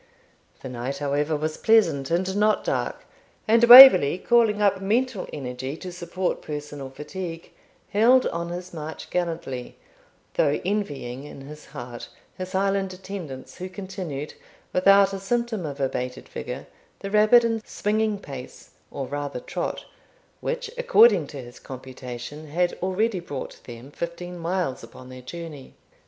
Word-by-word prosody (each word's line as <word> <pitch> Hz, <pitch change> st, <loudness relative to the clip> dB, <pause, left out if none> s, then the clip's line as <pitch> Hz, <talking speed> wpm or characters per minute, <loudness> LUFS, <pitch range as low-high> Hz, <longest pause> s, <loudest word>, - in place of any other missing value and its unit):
The 130 Hz, -, -5 dB
night, 125 Hz, +3 st, -4 dB
however, 145 Hz, +2 st, 0 dB
was 155 Hz, +1 st, -3 dB
pleasant, 215 Hz, -12 st, +3 dB
and 185 Hz, +3 st, 0 dB
not 210 Hz, +1 st, +2 dB
dark; -, -, -2 dB, 0.4 s
and 230 Hz, +2 st, +4 dB
Waverley, 240 Hz, -, +11 dB
calling 225 Hz, 0 st, +3 dB
up 200 Hz, -2 st, +2 dB
mental 220 Hz, +1 st, 0 dB
energy 130 Hz, +1 st, -5 dB
to 185 Hz, +1 st, -7 dB
support 180 Hz, +1 st, -3 dB
personal 145 Hz, -2 st, -6 dB
fatigue, 165 Hz, +4 st, -7 dB, 0.4 s
held 240 Hz, +5 st, +5 dB
on 170 Hz, 0 st, -4 dB
his 180 Hz, +1 st, -7 dB
march 155 Hz, -1 st, -7 dB
gallantly, 165 Hz, -8 st, -3 dB, 0.6 s
though -, -, +2 dB
envying 145 Hz, -10 st, -3 dB
in 145 Hz, -, -10 dB
his 150 Hz, +2 st, -11 dB
heart 120 Hz, -1 st, -8 dB, 0.3 s
his 185 Hz, 0 st, -7 dB
Highland 195 Hz, 0 st, 0 dB
attendants, 180 Hz, -8 st, -8 dB
who 185 Hz, +1 st, -5 dB
continued, 185 Hz, -7 st, -6 dB, 0.4 s
without 195 Hz, +1 st, +5 dB
a 195 Hz, -, -4 dB
symptom 220 Hz, -2 st, -2 dB
of 140 Hz, -1 st, -7 dB
abated 125 Hz, -2 st, -3 dB
vigour, -, -, -6 dB, 0.4 s
the 195 Hz, -, -5 dB
rapid 215 Hz, +3 st, +6 dB
and 225 Hz, -1 st, 0 dB
swinging 215 Hz, 0 st, 0 dB
pace, 135 Hz, -9 st, -10 dB, 0.2 s
or 135 Hz, -, -5 dB
rather 145 Hz, -1 st, -4 dB
trot, -, -, -4 dB, 0.5 s
which, 485 Hz, -2 st, -3 dB
according 230 Hz, -, +5 dB
to 145 Hz, -, -9 dB
his 120 Hz, 0 st, -13 dB
computation, 130 Hz, +3 st, -8 dB
had 175 Hz, +4 st, 0 dB
already 190 Hz, +2 st, 0 dB
brought 145 Hz, -6 st, -7 dB
them 120 Hz, +3 st, -10 dB
fifteen 175 Hz, +2 st, -6 dB
miles 170 Hz, -5 st, -2 dB
upon 130 Hz, 0 st, -12 dB
their 130 Hz, 0 st, -10 dB
journey. 155 Hz, 0 st, -9 dB
175 Hz, 140 wpm, -24 LUFS, 140-200 Hz, 0.6 s, Waverley